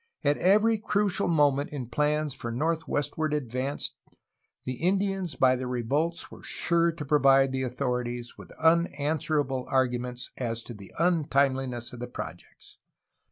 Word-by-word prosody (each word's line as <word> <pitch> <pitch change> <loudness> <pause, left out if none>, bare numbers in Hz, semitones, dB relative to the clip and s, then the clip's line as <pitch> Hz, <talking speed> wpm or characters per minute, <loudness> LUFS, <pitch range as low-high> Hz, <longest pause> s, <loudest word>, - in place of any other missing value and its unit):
At 145 0 +2
every 215 +4 +4
crucial 205 -2 0
moment 145 -4 +3
in 140 -4 -5
plans 150 +4 0
for 120 -2 -5
northwestward 155 +2 -1
advance 130 0 -2 0.7
the 130 -1 -3
Indians 195 -1 0
by 130 -1 +4
their 130 0 -4
revolts 140 +8 -1
were - - -11
sure 170 0 +1
to 160 -2 -7
provide 135 -2 +4
the 130 0 -2
authorities 125 -2 -3
with - - -13
unanswerable 150 -4 +1
arguments 125 -1 -1
as 115 -2 -3
to 120 - -8
the 100 -3 -12
untimeliness 135 -8 +1
of 125 - -8
the 125 - -5
projects. 125 - -9
140 Hz, 135 wpm, -28 LUFS, 125-160 Hz, 0.7 s, every